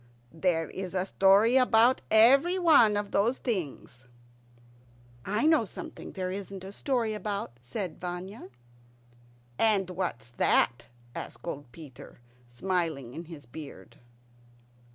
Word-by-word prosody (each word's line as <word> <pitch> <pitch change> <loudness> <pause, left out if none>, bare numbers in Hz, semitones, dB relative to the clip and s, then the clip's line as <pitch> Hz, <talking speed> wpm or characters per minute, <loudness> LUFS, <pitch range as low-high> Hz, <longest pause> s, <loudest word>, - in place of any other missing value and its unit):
"There 165 -1 0
is 190 -1 -7
a 185 0 0
story 200 +6 +4
about 250 0 +4
everyone 275 - +5
of 205 -1 -3
those 230 +6 +1
things." 145 - -4 1.2
"I 210 +7 0
know 315 -5 +4
something 205 - -9
there 185 -1 -3
isn't 195 -1 -7
a 190 - -8
story 235 -1 -1
about," 210 - -4
said 160 - -5
Vanya. 180 - -6 1.1
"And 200 -5 +2
what's 120 -11 -4
that?" 120 0 +1 0.3
asked - - -8
old 145 -6 -6
Peter, 145 -5 -13 0.3
smiling 150 -1 -2
in 165 +4 -7
his 160 -4 -11
beard. 140 +5 -11
190 Hz, 115 wpm, -28 LUFS, 160-220 Hz, 1.2 s, everyone